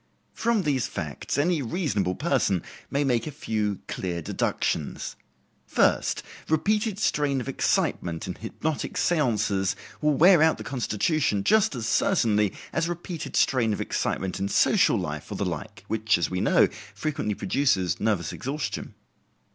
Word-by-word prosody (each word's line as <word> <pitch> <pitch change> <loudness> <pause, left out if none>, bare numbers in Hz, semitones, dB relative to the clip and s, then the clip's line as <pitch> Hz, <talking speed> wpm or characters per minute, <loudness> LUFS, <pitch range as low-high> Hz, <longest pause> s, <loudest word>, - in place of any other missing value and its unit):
From 230 -3 +1
these 135 -6 +1
facts 80 - -4
any 160 +2 +2
reasonable 110 - -1
person 130 - +1 0.3
may 140 +1 +1
make 120 -3 +1
a - - -3
few 110 - -2
clear 90 -2 -3
deductions. 75 -2 -2 0.5
First, - - +2 0.3
repeated 210 +6 +1
strain 145 -9 +1
of 125 - -5
excitement 85 -9 0
in 90 - -4
hypnotic 145 - -4
seances 110 - +1 0.3
will 150 -1 +3
wear 175 +3 +7
out 160 0 +4
the - - -7
constitution 125 - 0
just 215 - +3
as 115 -3 -4
certainly 110 - +2 0.2
as 170 - 0
repeated 175 -1 -5
strain 120 -5 +3
of - - -3
excitement 95 0 -2
in 100 - 0
social - - +4
life, - - -5
or - - -3
the - - -1
like, - - -5
which, 110 -1 +2
as 85 - -1
we 90 0 -1
know, - - +5 0.3
frequently 140 -9 -2
produces 95 - +1
nervous 95 -8 0
exhaustion. 140 +3 -4
125 Hz, 145 wpm, -26 LUFS, 100-155 Hz, 0.5 s, wear